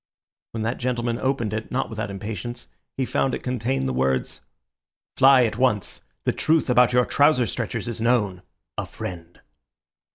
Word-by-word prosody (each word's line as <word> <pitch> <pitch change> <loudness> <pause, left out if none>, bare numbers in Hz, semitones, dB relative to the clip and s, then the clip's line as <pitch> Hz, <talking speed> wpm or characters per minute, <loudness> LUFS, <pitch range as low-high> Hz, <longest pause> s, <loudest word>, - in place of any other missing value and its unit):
When 110 -1 -3
that 115 +3 -2
gentleman 120 -1 -1
opened 130 -5 -1
it, 110 0 -4
not 130 - 0
without 110 -2 -4
impatience, 105 +4 -6 0.3
he 135 - 0
found 135 +1 0
it - - -8
contained 125 - -1
the 65 - -1
words:— 65 0 0 0.7
"Fly 135 -2 +6
at 110 0 -3
once. 125 -6 0 0.2
The - - +1
truth 155 -4 +2
about 125 0 +5
your 125 0 +4
trouser 145 -3 +3
stretchers 115 -1 -3
is 115 -2 -4
known.—A 105 -6 -2
FRIEND." 85 -2 -8
120 Hz, 155 wpm, -24 LUFS, 105-125 Hz, 0.7 s, Fly